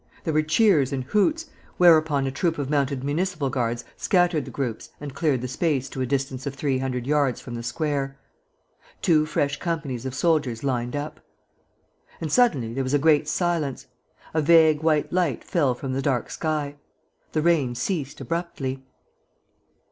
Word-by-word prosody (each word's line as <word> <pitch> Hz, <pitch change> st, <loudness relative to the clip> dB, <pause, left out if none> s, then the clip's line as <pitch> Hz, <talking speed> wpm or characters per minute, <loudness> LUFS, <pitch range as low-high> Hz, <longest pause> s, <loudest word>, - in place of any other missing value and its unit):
There 160 Hz, -, -1 dB
were 155 Hz, -, +4 dB
cheers 155 Hz, -, +3 dB
and 135 Hz, -2 st, -2 dB
hoots, 255 Hz, -, +1 dB, 0.3 s
whereupon 155 Hz, -5 st, +5 dB
a 135 Hz, -, -1 dB
troop 160 Hz, +4 st, 0 dB
of 140 Hz, -1 st, -3 dB
mounted 140 Hz, -2 st, 0 dB
municipal 155 Hz, -1 st, -1 dB
guards 120 Hz, -2 st, -1 dB
scattered 175 Hz, -6 st, +2 dB
the -, -, -8 dB
groups 125 Hz, -5 st, -4 dB
and 145 Hz, -2 st, -7 dB
cleared 145 Hz, -6 st, +1 dB
the 125 Hz, -, -3 dB
space 135 Hz, 0 st, 0 dB
to 130 Hz, -, -5 dB
a 130 Hz, -, 0 dB
distance 135 Hz, 0 st, -2 dB
of 140 Hz, -, -4 dB
three 140 Hz, -2 st, 0 dB
hundred 125 Hz, -2 st, -2 dB
yards 140 Hz, -3 st, +1 dB
from 125 Hz, -, -9 dB
the 120 Hz, -, -4 dB
square. 135 Hz, +2 st, -2 dB, 0.9 s
Two 155 Hz, -3 st, +4 dB
fresh 145 Hz, -1 st, -1 dB
companies 150 Hz, -8 st, -3 dB
of 130 Hz, -, -5 dB
soldiers 145 Hz, -7 st, +1 dB
lined 125 Hz, -1 st, -1 dB
up. 145 Hz, +1 st, -5 dB, 1.0 s
And 160 Hz, -2 st, -4 dB
suddenly 145 Hz, -, +3 dB
there 135 Hz, +2 st, -1 dB
was 130 Hz, +2 st, 0 dB
a -, -, +6 dB
great 150 Hz, 0 st, +3 dB
silence. 155 Hz, -5 st, -1 dB, 0.5 s
A 160 Hz, -, +2 dB
vague 160 Hz, -1 st, +5 dB
white 155 Hz, -1 st, +1 dB
light 175 Hz, -9 st, 0 dB
fell 140 Hz, -8 st, +1 dB
from 130 Hz, +1 st, -4 dB
the 135 Hz, -, -1 dB
dark 130 Hz, -4 st, -1 dB
sky. 150 Hz, -3 st, -2 dB, 0.6 s
The 155 Hz, -, +1 dB
rain 150 Hz, -8 st, +2 dB
ceased 140 Hz, +2 st, -3 dB
abruptly. 150 Hz, -6 st, -4 dB
145 Hz, 170 wpm, -24 LUFS, 130-160 Hz, 1.0 s, a